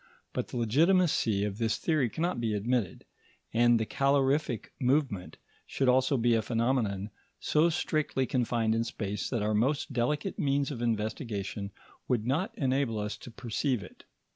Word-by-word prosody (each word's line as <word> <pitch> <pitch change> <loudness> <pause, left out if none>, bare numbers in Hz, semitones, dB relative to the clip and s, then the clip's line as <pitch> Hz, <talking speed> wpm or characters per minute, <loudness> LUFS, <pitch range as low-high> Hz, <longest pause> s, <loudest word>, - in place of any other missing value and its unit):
But - - -2
the - - -6
legitimacy 135 - +3
of 105 +1 -3
this 115 -2 +1
theory 155 -7 +1
cannot 170 +4 -2
be 110 -2 0
admitted, 115 -1 -1 0.5
and 120 0 +4
the 110 - 0
calorific 135 -1 +1
movement 125 -8 0 0.3
should 135 - -1
also 130 +2 +3
be 120 0 +3
a 115 - +3
phenomenon 115 -4 0 0.3
so 155 +3 +3
strictly 155 -4 0
confined 120 -3 +1
in 115 +1 +1
space 105 -3 -4
that 115 -5 -1
our 105 +1 +1
most 135 +6 0
delicate 130 +5 -1
means 140 0 +1
of 120 -4 -5
investigation 110 -3 -2 0.4
would 120 -4 0
not 160 - 0
enable 130 -4 0
us 105 0 -3
to - - -11
perceive 120 0 -2
it. 90 - -14
120 Hz, 155 wpm, -29 LUFS, 110-140 Hz, 0.5 s, and